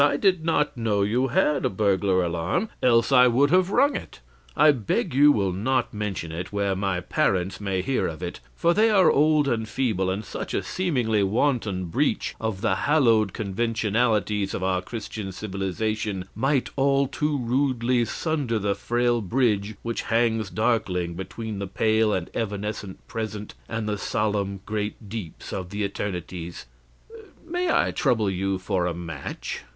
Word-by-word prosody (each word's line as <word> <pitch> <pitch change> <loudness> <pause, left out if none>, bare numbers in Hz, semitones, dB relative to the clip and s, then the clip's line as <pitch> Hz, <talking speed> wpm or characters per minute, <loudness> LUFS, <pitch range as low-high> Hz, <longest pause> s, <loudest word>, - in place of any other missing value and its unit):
I 145 0 +4
did 185 -1 +2
not 150 -3 +1
know 110 -4 +1
you 120 +6 +1
had 150 -4 +2
a - - +2
burglar 95 -2 +2
alarm, 85 - -1
else 115 0 +4
I 125 -1 +7
would 135 +5 +3
have 185 +1 +4
rung 280 +7 +3
it. - - -7 0.4
I 150 +1 +7
beg 120 -2 -1
you 145 +2 +7
will 100 -7 +1
not 120 +8 0
mention 100 -6 -3
it 90 +3 -5
where 100 -1 0
my 95 -2 -1
parents 90 +3 0
may 95 -2 -1
hear 135 +4 0
of 80 +1 -6
it, 85 -6 -5 0.2
for 170 - +2
they 220 +4 +4
are 190 -6 +5
old 150 0 +3
and 110 -4 -1
feeble, 105 -6 0
and 100 +3 -3
such - - -5
a - - 0
seemingly 125 - 0
wanton 105 -2 0
breach 85 - 0
of 110 -4 -2
the 115 - +2
hallowed 115 -9 +4
conventionalities 105 -1 0
of 95 - -3
our 95 -1 +1
Christian 105 -1 -6
civilization 100 +1 -3
might 135 +4 0
all 140 0 +3
too 150 +2 -1
rudely 125 -1 +1
sunder 140 -1 -1
the 100 -1 0
frail 120 +2 0
bridge 105 -1 0
which 115 0 -2
hangs 115 -3 +1
darkling 95 -6 0
between 100 +4 -6
the 100 - -3
pale 110 +2 +2
and 90 -4 -2
evanescent 105 -2 -4
present 110 -2 -5 0.2
and 110 -1 -3
the 105 -1 -2
solemn 100 -3 -1
great 105 0 -4
deeps 100 -7 -7
of 90 -2 -4
the 105 +2 -3
eternities. 90 -3 -5 0.8
May 350 +1 -1
I - - +2
trouble 110 -7 +1
you 95 +1 -1
for 95 -1 -1
a 85 - -2
match?' 85 -4 -6
110 Hz, 165 wpm, -25 LUFS, 95-125 Hz, 0.8 s, I